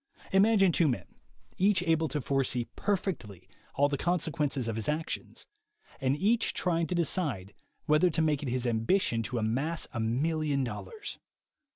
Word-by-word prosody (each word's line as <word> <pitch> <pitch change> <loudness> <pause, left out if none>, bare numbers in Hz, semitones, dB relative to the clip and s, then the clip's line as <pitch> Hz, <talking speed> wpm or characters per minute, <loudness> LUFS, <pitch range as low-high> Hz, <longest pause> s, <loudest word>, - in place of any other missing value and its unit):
Imagine 195 -1 +5
two 165 0 +3
men, 125 - -1 0.5
each 190 -1 +3
able 160 -2 +2
to 150 - -2
forsee 130 -3 0
perfectly 175 - -2 0.3
all 145 - +4
the 140 -1 -2
consequences 155 -7 0
of 115 - -2
his 110 +2 -2
actions, 155 +2 -4 0.5
and 135 +1 +1
each 220 +7 +1
trying 170 -2 0
to 180 - -2
decide 145 - 0 0.3
whether 150 +4 +4
to 160 0 0
make 150 -2 +1
it 140 - -3
his 125 0 -1
ambition 115 - +1
to 120 +3 -4
amass 135 +9 0
a 120 - -3
million 140 +5 0
dollars. 275 - -6
150 Hz, 155 wpm, -30 LUFS, 125-175 Hz, 0.5 s, Imagine